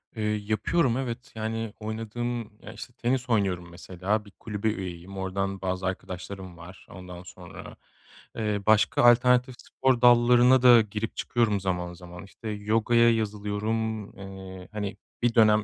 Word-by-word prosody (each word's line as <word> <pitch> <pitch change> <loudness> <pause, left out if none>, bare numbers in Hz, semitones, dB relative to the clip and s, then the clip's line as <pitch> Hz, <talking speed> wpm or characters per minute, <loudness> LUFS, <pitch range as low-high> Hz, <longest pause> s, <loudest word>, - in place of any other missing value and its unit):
Eee, 110 - -3 0.2
yapıyorum. 120 +5 +1
Evet. 125 +1 -5
Yani 110 0 -3
oynadığım 115 +2 -4 0.2
ya, - - -10
işte, 120 - -10
tenis 125 +1 -1
oynuyorum, 95 -6 0
mesela, 95 +4 -3
bir 100 - -15
kulübe 105 0 -4
üyeyim, 95 -2 -6
oradan 95 +1 -3
bazı 95 0 -2
arkadaşlarım 95 -1 -6
var. 90 +3 -13
Ondan 90 -1 -10
sonra, 90 0 -11 0.6
eee, 105 -2 -1
başka 110 +2 +3
alternatif 125 +1 +5
spor 130 -2 0
dallarına 125 +1 +6
da 120 -2 +8
girip 105 +1 -4
çıkıyorum 110 -4 0
zaman 90 -2 -3
zaman. 90 0 -11
İşte 110 +3 -9
yogaya 115 +3 +3
yazılıyorum, 110 0 -2
eee, 95 -1 -9
hani 105 -1 -4 0.2
bir 120 0 +1
dönem 110 -1 +5
105 Hz, 140 wpm, -27 LUFS, 95-115 Hz, 0.6 s, da